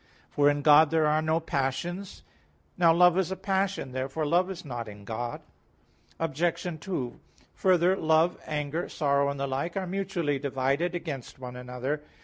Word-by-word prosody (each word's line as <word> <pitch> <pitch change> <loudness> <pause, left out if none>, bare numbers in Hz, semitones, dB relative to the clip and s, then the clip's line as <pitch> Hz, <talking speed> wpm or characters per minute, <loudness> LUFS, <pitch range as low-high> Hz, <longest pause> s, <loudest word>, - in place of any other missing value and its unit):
For 145 0 +4
in 145 0 0
God 150 0 +7
there 160 0 +2
are 150 +1 +3
no 160 +1 +1
passions. 165 +6 -3 0.5
Now 170 -2 +5
love 180 +2 +5
is 185 - 0
a 190 - -2
passion. 195 -6 -1
Therefore 135 +4 -2
love 175 +5 +2
is 180 -3 -7
not 120 -4 -5
in 105 -1 -11
God. 120 +2 -4 0.8
Obj. 165 +3 -1 0.2
2: 130 -11 -4 0.3
Further, 185 0 +3
love, 160 0 +3
anger, 150 +2 -2
sorrow 140 -2 +1
and 140 0 -4
the 140 - 0
like, 140 +7 -3
are 190 - -1
mutually 175 -6 -1
divided 140 +6 0
against 150 -7 -6
one 125 -1 -8
another. 125 +4 -4
155 Hz, 160 wpm, -28 LUFS, 135-175 Hz, 0.8 s, God